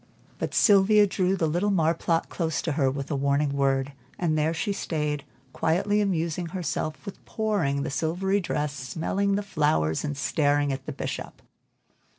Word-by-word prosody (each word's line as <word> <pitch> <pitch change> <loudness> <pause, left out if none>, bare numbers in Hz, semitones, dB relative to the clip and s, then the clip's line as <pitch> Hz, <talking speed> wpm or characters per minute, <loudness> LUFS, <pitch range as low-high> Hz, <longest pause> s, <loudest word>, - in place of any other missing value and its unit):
But - - -3
Sylvia 205 0 +6
drew 190 -1 +1
the 175 - 0
little 175 +6 +1
marplot 165 -2 +1
close 160 -4 -2
to 160 - -1
her 140 -2 +2
with 140 +2 -4
a - - +1
warning 140 +1 +1
word, 135 0 +1 0.2
and 165 -3 0
there 155 +1 +2
she 165 +5 -1
stayed, 150 -6 -2 0.3
quietly 200 +6 +1
amusing 170 -3 -1
herself 160 -3 -3
with 200 - -9
"pooring" 195 -11 0
the 155 - -3
silvery 180 +7 0
dress, 150 -5 -2
smelling 160 +10 -1
the 205 - -1
flowers 145 - +1
and 145 -2 -3
staring 145 0 +1
at 135 0 -7
the - - -2
Bishop. - - -6
160 Hz, 165 wpm, -26 LUFS, 145-190 Hz, 0.3 s, Sylvia